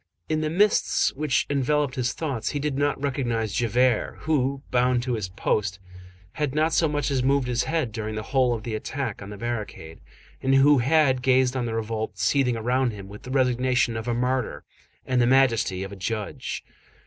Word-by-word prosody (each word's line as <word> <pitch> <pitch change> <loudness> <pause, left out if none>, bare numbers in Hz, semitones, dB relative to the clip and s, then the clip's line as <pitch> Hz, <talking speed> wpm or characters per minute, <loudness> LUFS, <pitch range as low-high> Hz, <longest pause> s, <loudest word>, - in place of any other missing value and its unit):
In 155 0 0
the 155 - -1
mists 200 +6 +2
which 150 -1 0
enveloped 145 0 +1
his 130 -2 -1
thoughts, 140 -8 -3
he 145 - -2
did 145 -1 -2
not 145 +1 0
recognize 120 -6 -1
Javert, 120 0 +1
who, 140 -3 0
bound 125 0 +2
to 125 -1 -2
his 105 -5 -3
post, 95 0 -1 0.5
had 145 +1 -2
not 155 +1 +2
so 165 - +3
much 145 0 -1
as 135 -2 +1
moved 135 0 +2
his 125 0 0
head 160 -8 -1
during 110 0 -4
the 110 - -3
whole 125 -1 +2
of 110 - -7
the 115 - -4
attack 120 0 -4
on 100 - -8
the 105 - -8
barricade, 105 -8 -5 0.4
and 135 0 +2
who 140 +1 +6
had 135 0 +3
gazed 130 0 +3
on 125 -2 -1
the 115 - -3
revolt 110 0 -3
seething 130 -4 +2
around 125 +1 0
him 100 -2 -9
with 105 +1 -10
the 125 - -10
resignation 125 -2 +1
of 110 +1 -5
a 120 - 0
martyr 125 0 -1 0.4
and 125 -1 +1
the 120 - +3
majesty 120 -8 +3
of 95 - -7
a - - -7
judge. 105 +2 -4
125 Hz, 195 wpm, -25 LUFS, 115-140 Hz, 0.5 s, who